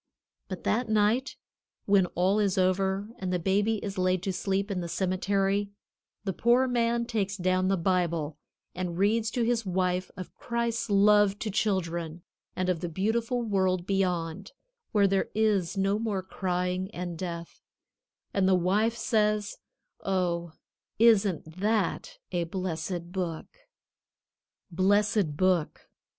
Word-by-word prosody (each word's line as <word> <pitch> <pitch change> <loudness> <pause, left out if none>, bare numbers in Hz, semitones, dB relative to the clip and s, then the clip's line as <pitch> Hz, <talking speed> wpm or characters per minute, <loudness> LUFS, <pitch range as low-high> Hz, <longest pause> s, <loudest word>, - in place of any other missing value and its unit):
But 185 -2 -6
that 230 +2 0
night, 220 +5 +1 0.5
when 195 -2 +4
all 190 +4 +2
is 200 -2 +1
over, 190 +2 +1
and 185 -1 -3
the 180 - +1
baby 200 +5 +1
is 195 -2 -4
laid 185 0 +1
to 190 - -1
sleep 195 +2 -1
in 185 -2 -2
the 170 - -4
cemetery, 195 +2 0 0.5
the 195 -2 -2
poor 245 +5 +3
man 235 -1 +1
takes 205 -4 -2
down 185 0 +1
the 195 0 +2
Bible 170 -4 0 0.3
and 180 -1 -4
reads 215 +3 +2
to 240 +1 -1
his 230 0 +1
wife 185 -1 -1
of 185 - -8
Christ's 235 -1 -2
love 205 0 +5
to 215 0 -3
children, 170 -5 -1 0.3
and 185 0 -1
of 180 -3 +1
the 175 0 -4
beautiful 230 +7 -1
world 190 -4 +1
beyond, 180 - -1 0.4
where 205 -2 +4
there 195 0 +1
is 205 -5 +1
no 195 +2 +1
more 210 -4 -2
crying 180 0 -2
and 175 -1 -4
death, 170 -1 -6 0.7
and 190 -1 +2
the 190 - +5
wife 205 +6 +1
says, 210 -2 0 0.4
"Oh, 175 -3 -1 0.4
isn't 200 -7 +3
that 220 - 0
a 175 -1 0
blessed 175 -1 -4
Book!" 180 -4 -3 1.3
Blessed 200 -2 +2
Book. 185 -4 0
190 Hz, 135 wpm, -28 LUFS, 180-210 Hz, 1.3 s, love